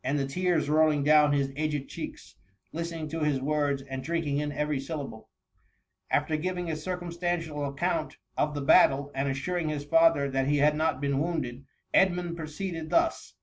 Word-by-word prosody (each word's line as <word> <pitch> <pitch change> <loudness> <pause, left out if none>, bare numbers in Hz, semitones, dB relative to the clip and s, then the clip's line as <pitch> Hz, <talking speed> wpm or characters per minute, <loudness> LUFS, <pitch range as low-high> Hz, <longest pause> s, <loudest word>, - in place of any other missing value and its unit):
TS 140 +3 0
the 140 - 0
tears 175 +2 0
rolling 155 -1 +3
down 150 0 +5
his 140 -1 0
aged 150 -2 -2
cheeks, - - -8 0.4
listening 165 -1 -4
to 165 +2 -4
his 150 -3 +1
words, 145 -1 0
and 135 -1 -6
drinking 155 -2 -1
in 150 0 -2
every 150 0 -1
syllable* 135 -5 -6 0.8
After 155 - +1
giving 180 +1 -2
a - - -2
circumstantial 170 -2 -3
account 160 +2 -2 0.2
of 150 0 0
the 145 - -2
battle, 140 +1 +5
and 135 +1 -1
assuring 160 +5 -2
his 145 -1 -3
father 165 -2 +4
that 135 0 0
he 145 +1 +2
had 150 +1 +4
not 155 -3 0
been 140 -1 0
wounded, 140 -6 -3 0.3
Edmund 180 -2 +2
proceeded 160 +1 -5
thus. 335 0 +1
150 Hz, 170 wpm, -28 LUFS, 140-165 Hz, 0.8 s, down